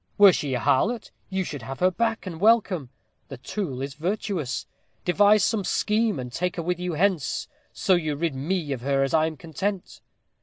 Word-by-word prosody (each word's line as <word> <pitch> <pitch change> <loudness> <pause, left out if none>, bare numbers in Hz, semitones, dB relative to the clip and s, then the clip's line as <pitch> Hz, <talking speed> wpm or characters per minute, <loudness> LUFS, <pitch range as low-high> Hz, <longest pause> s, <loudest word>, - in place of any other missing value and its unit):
Were 200 -2 +8
she 140 -5 -1
a - - 0
harlot, 220 - +1 0.2
you 190 -1 -1
should 145 -6 -6
have 130 +4 -7
her 185 +1 +4
back 225 +3 -1
and 170 -3 -7
welcome. 200 - +3 0.4
The 135 - -8
tool 135 - -4
is 140 0 -5
virtuous. 175 - -2 0.4
Devise 205 +3 +5
some 220 -4 +1
scheme, 215 -2 +1
and 125 -1 -6
take 180 +4 -1
her 170 - -3
with 180 +1 -1
you 180 -1 -2
hence 175 -2 0 0.2
so 190 - +1
you 155 -4 +1
rid 165 0 -1
me 150 +3 -2
of 130 -3 -3
her 135 +1 +2
I 160 0 +4
am 160 -1 -6
content." 180 +6 -4
175 Hz, 190 wpm, -25 LUFS, 140-200 Hz, 0.4 s, Were